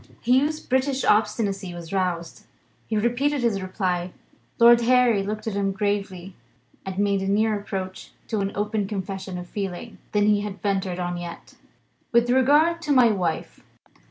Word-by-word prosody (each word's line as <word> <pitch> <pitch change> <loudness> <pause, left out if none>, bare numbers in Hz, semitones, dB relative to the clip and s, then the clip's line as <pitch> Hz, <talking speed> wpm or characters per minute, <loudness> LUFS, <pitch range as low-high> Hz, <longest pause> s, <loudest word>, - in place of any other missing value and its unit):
Hugh's 275 +6 +2
British 265 +1 0
obstinacy 210 -3 +1
was 170 +1 -9
roused; 180 -3 -2 0.4
he 220 - -1
repeated 250 +6 +1
his 220 -5 0
reply. 185 -2 -2 0.4
Lord 235 0 +7
Harry 245 -3 +4
looked 210 +2 -4
at 220 - -2
him 200 0 0
gravely, 195 -2 -3 0.5
and 190 -1 -6
made 200 -1 +1
a 195 - -2
nearer 210 +1 +2
approach 190 -2 -6 0.2
to 220 - -1
an 195 0 -1
open 210 0 -1
confession 190 -2 -5
of 180 - -6
feeling 195 +4 -6
than 205 -1 +2
he 210 -1 +3
had 205 -1 -6
ventured 195 -3 -1
on 175 -1 -3
yet. 175 -1 -8 0.6
"With 235 +1 +3
regard 290 +6 +4
now 335 - -14
to 305 -3 -3
my 250 -4 +6
wife. 180 -5 -3
205 Hz, 160 wpm, -24 LUFS, 190-235 Hz, 0.6 s, Lord